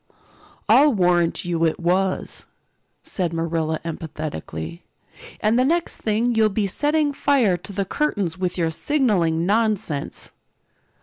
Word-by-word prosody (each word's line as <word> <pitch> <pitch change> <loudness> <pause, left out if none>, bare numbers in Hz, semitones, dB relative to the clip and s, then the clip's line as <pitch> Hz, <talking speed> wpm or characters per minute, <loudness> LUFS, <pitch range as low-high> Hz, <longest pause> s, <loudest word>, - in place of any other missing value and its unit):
"I'll 295 +1 +6
warrant 175 -3 +2
you 170 -1 -1
it 160 -1 +1
was," 185 +2 -1 0.6
said 175 -3 -2
Marilla 165 -1 -1
emphatically. 115 - -6 0.6
"And 220 +3 +3
the - - +4
next 335 +5 0
thing 225 +3 0
you'll 220 -1 +3
be 210 0 0
setting 295 +8 +1
fire 265 -10 +2
to 175 - -8
the 200 0 -2
curtains 200 - -1
with 185 -1 -3
your 165 -2 +1
signaling 175 - +1
nonsense." 205 -8 -1
185 Hz, 125 wpm, -22 LUFS, 165-225 Hz, 0.6 s, I'll